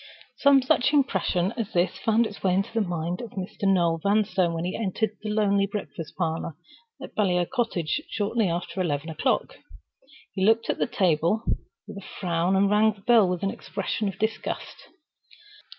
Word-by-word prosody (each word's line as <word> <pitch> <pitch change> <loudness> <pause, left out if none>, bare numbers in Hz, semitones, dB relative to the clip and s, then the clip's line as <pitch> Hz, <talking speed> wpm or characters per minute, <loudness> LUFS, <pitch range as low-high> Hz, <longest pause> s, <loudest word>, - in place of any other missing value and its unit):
Some 280 -2 +5
such 265 +2 +2
impression 190 - +1
as 225 -2 -3
this 175 0 +1
found 225 +1 +2
its 205 - -7
way 185 -2 +2
into 195 +3 -1
the 225 - +1
mind 175 -2 -2
of 235 -3 -8
Mr. 195 +1 -4
Noel 170 -3 +2
Vanstone 200 -3 +2
when 165 +1 -3
he 180 - -3
entered 220 0 -1
the 215 - -4
lonely 200 -2 +2
breakfast 190 -5 -6
parlor 165 -3 -2 0.4
at - - -9
Baliol 180 -4 +2
Cottage 230 - -1
shortly 210 -1 0
after 175 +2 -3
eleven 155 -2 -2
o'clock. 155 - -1 0.8
He 190 - -1
looked 225 +3 +3
at - - -6
the - - +1
table 180 0 +1 0.4
with - - -9
a 200 - -9
frown, 175 0 +1
and 195 +1 +4
rang 210 +2 +4
the 200 - -20
bell 220 -3 +5
with 180 0 -2
an 195 - +1
expression 200 +2 -3
of 195 - -4
disgust. 220 0 -4
195 Hz, 175 wpm, -26 LUFS, 175-220 Hz, 0.8 s, Some